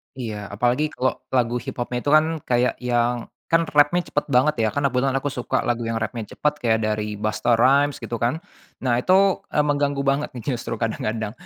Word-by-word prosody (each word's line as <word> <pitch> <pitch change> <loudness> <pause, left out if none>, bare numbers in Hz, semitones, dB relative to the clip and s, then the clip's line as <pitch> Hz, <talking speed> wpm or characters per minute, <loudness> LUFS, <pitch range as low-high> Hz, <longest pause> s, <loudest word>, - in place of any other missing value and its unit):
Iya, 110 -5 -5
apalagi 120 +9 +1
kalo 130 +1 -1
lagu 125 -1 +1
hiphopnya 120 0 -4
itu 145 - -2
kan 160 +1 +3
kayak 125 0 +1
yang 120 -1 0 0.2
kan 165 0 +3
rap-nya 155 +3 +3
cepet 145 - -1
banget 140 +2 +3
ya, 110 - +3
karena 140 -1 +1
kebetulan 130 +1 +1
aku 140 +1 -1
suka 125 -1 -1
lagu 120 -1 0
yang 115 - -2
rap-nya 110 -1 -4
cepet 150 0 +1
kayak 110 -2 +2
dari 105 -1 -2
Busta 110 +3 +1
Rhymes 140 +4 +4
gitu 115 0 -5
kan. 125 +9 -1 0.4
Nah, 120 -1 +2
itu, 190 +5 +3
eee, 150 - +1
mengganggu 145 -1 0
banget 140 +2 0
nih 120 +3 -3
justru 120 -2 -3
kadang-kadang. 110 -1 -2
125 Hz, 190 wpm, -23 LUFS, 115-145 Hz, 0.4 s, Rhymes